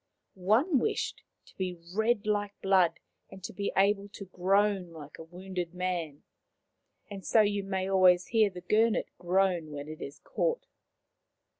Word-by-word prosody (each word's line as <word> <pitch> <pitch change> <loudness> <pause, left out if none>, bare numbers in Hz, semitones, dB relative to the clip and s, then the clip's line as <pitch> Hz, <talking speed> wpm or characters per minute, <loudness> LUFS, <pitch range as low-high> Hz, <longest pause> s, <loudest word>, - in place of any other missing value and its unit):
One 230 - +2
wished 430 - -2 0.2
to - - -20
be 185 -2 -3 0.2
red 220 +1 +1
like 205 -1 -1
blood, 190 -3 +3 0.3
and 190 - -13
to - - -6
be 200 +2 -2
able 200 +1 +2
to 195 - -8
groan 190 +1 +1
like 150 -3 -11
a - - -7
wounded 180 +1 -6
man; 175 -5 -3 0.9
and 195 -1 -7
so 220 - +4
you 205 -1 0
may 190 -1 -2
always 185 -2 +5
hear 220 -3 +3
the 180 -2 -10
Gurnet 220 +4 +1
groan 180 -2 +1
when 145 0 -7
it 155 0 -9
is 140 - -7
caught. - - -2
190 Hz, 155 wpm, -29 LUFS, 180-205 Hz, 0.9 s, always